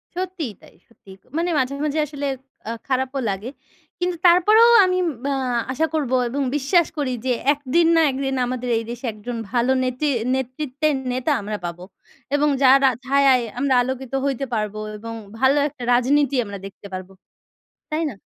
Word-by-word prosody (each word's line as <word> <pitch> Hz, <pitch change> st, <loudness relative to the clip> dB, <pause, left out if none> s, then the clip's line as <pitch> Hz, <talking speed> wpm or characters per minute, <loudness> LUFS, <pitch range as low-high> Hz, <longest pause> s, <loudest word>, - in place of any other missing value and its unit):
সত্যিই 360 Hz, -, -4 dB
তাই, -, -, -18 dB
সত্যিই। 195 Hz, -4 st, -16 dB, 0.2 s
মানে 345 Hz, +1 st, 0 dB
মাঝে, 260 Hz, +1 st, 0 dB
মাঝে 305 Hz, +1 st, -1 dB
আসলে 285 Hz, -1 st, -6 dB, 0.4 s
আ -, -, -1 dB, 0.2 s
খারাপও 265 Hz, +1 st, -1 dB
লাগে। 200 Hz, +5 st, -4 dB, 0.5 s
কিন্তু 360 Hz, 0 st, -1 dB
তারপরেও 425 Hz, +7 st, +6 dB, 0.2 s
আমি 365 Hz, 0 st, +1 dB, 0.3 s
অ্যা 280 Hz, -1 st, 0 dB, 0.4 s
আশা 315 Hz, +5 st, +1 dB
করবো 275 Hz, -5 st, 0 dB
এবং 280 Hz, +3 st, -2 dB
বিশ্বাস 310 Hz, +4 st, +3 dB
করি 275 Hz, -3 st, -1 dB
যে 255 Hz, -, +1 dB, 0.2 s
১ 290 Hz, -, -11 dB, 0.2 s
দিন 335 Hz, -1 st, +5 dB
না 325 Hz, -, +5 dB
১ 260 Hz, -, -5 dB
দিন 270 Hz, 0 st, -1 dB
আমাদের 250 Hz, 0 st, -3 dB
এই 225 Hz, -, -2 dB
দেশে 240 Hz, +2 st, -6 dB
একজন 230 Hz, +3 st, -6 dB
ভালো 245 Hz, +1 st, +2 dB
নেতি 255 Hz, +4 st, -2 dB, 0.3 s
নেতৃত্বের 275 Hz, +3 st, -1 dB, 0.2 s
নেতা 255 Hz, +4 st, -1 dB
আমরা 210 Hz, +1 st, -4 dB
পাবো 175 Hz, +1 st, -6 dB, 0.5 s
এবং 295 Hz, +1 st, +3 dB
যারা 270 Hz, +1 st, +6 dB, 0.2 s
ছায়ায় 270 Hz, -2 st, +4 dB, 0.2 s
আমরা 275 Hz, -1 st, +2 dB
আলোকিত 260 Hz, 0 st, -4 dB
হইতে 275 Hz, -1 st, -1 dB
পারবো 215 Hz, -1 st, -2 dB, 0.2 s
এবং 230 Hz, +2 st, -7 dB, 0.3 s
ভালো 265 Hz, +3 st, +4 dB
একটা 270 Hz, -4 st, -10 dB
রাজনীতি 275 Hz, +3 st, +2 dB
আমরা 200 Hz, 0 st, -7 dB
দেখতে 195 Hz, +1 st, -10 dB
পারবো। 185 Hz, +1 st, -6 dB, 0.8 s
তাই 310 Hz, +2 st, 0 dB
না? -, -, -11 dB
265 Hz, 165 wpm, -22 LUFS, 240-295 Hz, 0.8 s, তারপরেও